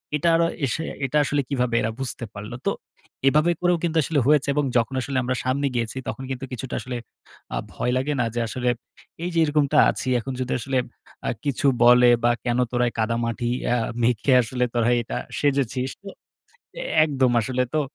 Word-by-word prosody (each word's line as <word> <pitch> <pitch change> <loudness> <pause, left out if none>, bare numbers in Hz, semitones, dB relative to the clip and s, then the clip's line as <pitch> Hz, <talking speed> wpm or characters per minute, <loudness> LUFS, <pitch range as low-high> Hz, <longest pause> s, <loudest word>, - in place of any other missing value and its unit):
এটা 170 +3 +2
অরা 165 0 +3 0.2
এস 120 - -1 0.3
এটা 140 +3 0
আসলে 145 +1 +1
কিভাবে 125 -4 0
এরা 110 - -1
বুঝতে 130 -2 -3
পারলো। 105 +3 -7
তো - - +2 0.6
এভাবে 155 +5 +4
করেও 175 -1 +3
কিন্তু 165 -1 0
আসলে 155 0 +1
হয়েছে, 150 -2 +4
এবং 145 -1 +1
যখন 120 +2 0
আসলে 135 0 -3
আমরা 130 +1 -1
সামনে 140 +2 0
গিয়েছি, 115 +1 -2
তখন 135 - -4
কিন্তু 135 0 -4
কিছুটা 125 +1 -5
আসলে 125 -1 -5 0.6
আ - - -1 0.2
ভয় 125 - -1
লাগে 140 +3 0
না 120 - +2
যে, - - 0
আসলে 125 +2 -3 0.6
এই 175 - -1
যে 165 - +2
এরকমটা 145 -2 +1
আছি, - - -3
এখন 135 +3 -5
যদি 125 - -3
আসলে 135 +2 -1 0.5
আ - - +2 0.2
কিছু 140 0 -1 0.2
বলে, 125 0 +7
বা, 120 - +5
কেন 120 0 +1
তোরা 125 0 +2
এ - - -14
কাদামাটি 115 +1 -1 0.2
আ - - +3 0.3
মেখে 120 +3 +2
আসলে 125 +2 -2
তোরা 120 -1 +2
এটা 115 - -5 0.2
সেজেছিস? 135 -2 0
তো 195 - -7 1.0
একদম 135 -4 +2
আসলে 125 +2 0
তো 155 - +3
130 Hz, 185 wpm, -24 LUFS, 120-140 Hz, 1.0 s, বলে